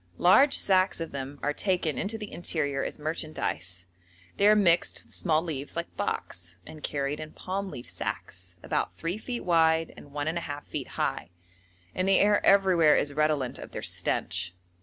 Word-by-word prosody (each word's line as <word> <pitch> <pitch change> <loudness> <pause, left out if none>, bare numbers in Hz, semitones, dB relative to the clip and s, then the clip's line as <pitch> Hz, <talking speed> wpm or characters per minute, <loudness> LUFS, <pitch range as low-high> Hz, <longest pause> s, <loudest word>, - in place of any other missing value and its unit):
Large 270 +11 +6
sacks 190 -2 +3
of 165 - -4
them 140 +1 -5
are 145 - +1
taken 180 -4 0
into 215 +3 -2
the 210 -2 -7
interior 145 -5 -1
as - - -4
merchandise; 150 - -3 0.5
they 200 - +5
are 210 - +7
mixed 175 -5 +3
with - - -13
small 160 -2 +2
leaves 145 -5 -5
like 170 0 -4
box, 85 0 -3
and 155 - -11
carried 140 0 -2
in 155 0 -7
palm 195 +1 -4
leaf 120 -8 -8
sacks, 90 0 -5
about - - -2
3 170 +5 -3
feet 240 +1 -5
wide 165 -2 +3
and - - -12
1½ 145 0 -3
feet - - -5
high, - - -1 0.6
and 185 - -1
the 195 - +6
air 205 0 +4
everywhere 185 -6 +5
is 145 - -1
redolent 150 -4 0
of - - -10
their - - -5
stench. 90 0 -1
160 Hz, 170 wpm, -28 LUFS, 145-185 Hz, 0.6 s, are